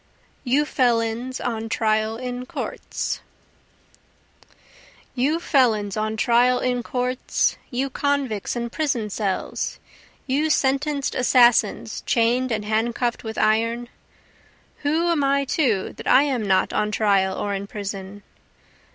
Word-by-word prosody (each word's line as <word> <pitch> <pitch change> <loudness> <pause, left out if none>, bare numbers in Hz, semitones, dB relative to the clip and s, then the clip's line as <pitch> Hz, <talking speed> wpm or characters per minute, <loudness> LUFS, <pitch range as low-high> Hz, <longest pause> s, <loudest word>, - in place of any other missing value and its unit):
You 275 +4 +2
Felons 240 -1 0
on 225 -2 -3
Trial 220 0 0
in 250 0 -5
Courts - - -4 1.9
You 285 +6 +1
felons 225 - +2
on 215 0 -2
trial 245 +2 +3
in 250 -1 0
courts, 250 +2 -1
You 265 +2 -2
convicts 275 -9 -1
in 235 -1 -3
prison 245 -9 -1
cells, 195 -2 -2 0.5
you 285 +4 +1
sentenced 280 0 +1
assassins 240 -4 +3
chain'd 240 +2 +1
and 215 -2 -2
handcuff'd 235 +3 0
with 220 -1 -6
iron, 230 +2 +1 0.9
Who 315 +4 0
am 310 -4 +1
I 275 0 +2
too 245 - 0
that - - -8
I 270 - +6
am 255 -7 -1
not 190 -1 +2
on 210 - +1
trial 200 -3 +2
or 205 - -2
in 200 0 -4
prison? 200 -1 -6
240 Hz, 120 wpm, -23 LUFS, 215-265 Hz, 1.9 s, I